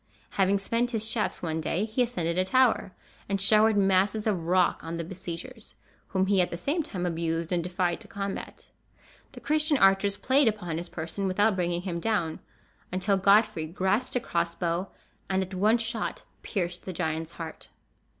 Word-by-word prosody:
Having 195 Hz, 0 st, +2 dB
spent 230 Hz, +5 st, 0 dB
his 220 Hz, -2 st, -1 dB
shafts 220 Hz, -4 st, -1 dB
one 160 Hz, -1 st, -2 dB
day, 180 Hz, +6 st, -1 dB
he 225 Hz, +3 st, -1 dB
ascended 175 Hz, -9 st, 0 dB
a 185 Hz, -, +2 dB
tower, 240 Hz, 0 st, +3 dB, 0.4 s
and 200 Hz, 0 st, 0 dB
showered 215 Hz, +2 st, +5 dB
masses 195 Hz, +2 st, +2 dB
of 185 Hz, -7 st, -1 dB
rock 180 Hz, 0 st, +2 dB
on 165 Hz, +1 st, -4 dB
the 170 Hz, -, -3 dB
besiegers, 190 Hz, +6 st, -7 dB, 0.3 s
whom 190 Hz, -1 st, +1 dB
he 195 Hz, -1 st, +3 dB
at 175 Hz, -, +1 dB
the 170 Hz, -, -5 dB
same 295 Hz, -, -1 dB
time 185 Hz, -, -4 dB
abused 165 Hz, -1 st, -2 dB
and 175 Hz, -2 st, +1 dB
defied 180 Hz, -1 st, -1 dB
to 215 Hz, -, -10 dB
combat. 200 Hz, -1 st, -6 dB, 0.6 s
The -, -, -9 dB
Christian 305 Hz, 0 st, +2 dB
archers 195 Hz, -1 st, +4 dB
played 265 Hz, +3 st, +3 dB
upon 180 Hz, -7 st, -1 dB
his 175 Hz, 0 st, -6 dB
person, 175 Hz, +4 st, -3 dB
without 205 Hz, +3 st, +2 dB
bringing 175 Hz, -1 st, -1 dB
him 175 Hz, -3 st, -3 dB
down; 170 Hz, -6 st, -1 dB, 0.5 s
until 185 Hz, +2 st, +1 dB
Godfrey 200 Hz, -3 st, +3 dB
grasped 190 Hz, +10 st, -1 dB
a -, -, +3 dB
cross 170 Hz, -6 st, -1 dB
bow, 175 Hz, +2 st, -1 dB, 0.4 s
and 190 Hz, 0 st, +1 dB
at 190 Hz, +1 st, -9 dB
one 210 Hz, +5 st, +3 dB
shot 225 Hz, 0 st, -3 dB, 0.2 s
pierced 180 Hz, -3 st, -3 dB
the 185 Hz, -, -5 dB
giant's 160 Hz, -1 st, -3 dB
heart. 165 Hz, -2 st, -8 dB
190 Hz, 180 wpm, -27 LUFS, 175-215 Hz, 0.6 s, showered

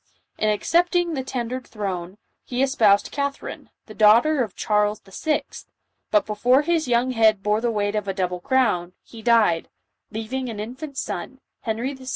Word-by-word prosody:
In 215 Hz, -, +2 dB
accepting 345 Hz, -, +2 dB
the 270 Hz, -, -2 dB
tendered 255 Hz, 0 st, -4 dB
throne, 190 Hz, -3 st, -5 dB, 0.3 s
he 255 Hz, +1 st, -1 dB
espoused 220 Hz, -7 st, +3 dB
Catherine, 280 Hz, -1 st, -4 dB, 0.2 s
the 215 Hz, -, -11 dB
daughter 230 Hz, +8 st, +5 dB
of 220 Hz, -6 st, -3 dB
Charles 210 Hz, 0 st, +1 dB
VI., 300 Hz, -, -2 dB, 0.7 s
but 315 Hz, -3 st, +3 dB
before 245 Hz, +6 st, +3 dB
his 330 Hz, -2 st, 0 dB
young 245 Hz, +1 st, +2 dB
head 220 Hz, -4 st, +3 dB
bore 210 Hz, +1 st, +1 dB
the 240 Hz, -, +1 dB
weight 205 Hz, -2 st, -1 dB
of 210 Hz, -2 st, -2 dB
a 195 Hz, -, -1 dB
double 180 Hz, -2 st, -1 dB
crown, 185 Hz, -6 st, +1 dB
he 230 Hz, -, -12 dB
died, 220 Hz, -8 st, +3 dB, 0.4 s
leaving 245 Hz, +4 st, -4 dB
an 215 Hz, -3 st, -6 dB
infant 260 Hz, +6 st, -7 dB
son, 260 Hz, +8 st, -4 dB, 0.2 s
Henry 235 Hz, +4 st, -2 dB
VI. 260 Hz, -1 st, -12 dB
230 Hz, 165 wpm, -23 LUFS, 210-265 Hz, 0.7 s, daughter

